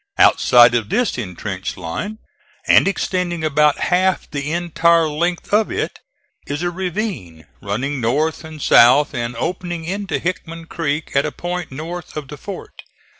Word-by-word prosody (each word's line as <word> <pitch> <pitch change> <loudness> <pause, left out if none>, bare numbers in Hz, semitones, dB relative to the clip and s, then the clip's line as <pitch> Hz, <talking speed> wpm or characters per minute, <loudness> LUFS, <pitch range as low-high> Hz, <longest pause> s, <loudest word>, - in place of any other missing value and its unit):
Outside 120 -1 +6
of 115 -4 0
this 245 -1 +1
intrenched 95 -3 -5
line, 95 - -5 0.5
and - - +5
extending 180 -4 -1
about 150 -1 +3
half 185 +1 +1
the 145 0 -3
entire 170 -1 +2
length 170 +5 -2
of 215 +1 +3
it, - - -3 0.5
is 145 +4 -3
a 175 - 0
ravine 175 - -4 0.2
running 130 +7 -2
north 150 +9 0
and 160 -1 -9
south 135 +2 +5
and 120 0 -3
opening 175 +4 -3
into 195 +3 -2
Hickman 165 -2 -4
creek 160 -1 -3
at 140 - +4
a - - -4
point 175 -1 -5
north 160 +4 -7
of 145 -3 -6
the 150 - -8
fort. 200 +6 -9
160 Hz, 150 wpm, -19 LUFS, 135-175 Hz, 0.5 s, Outside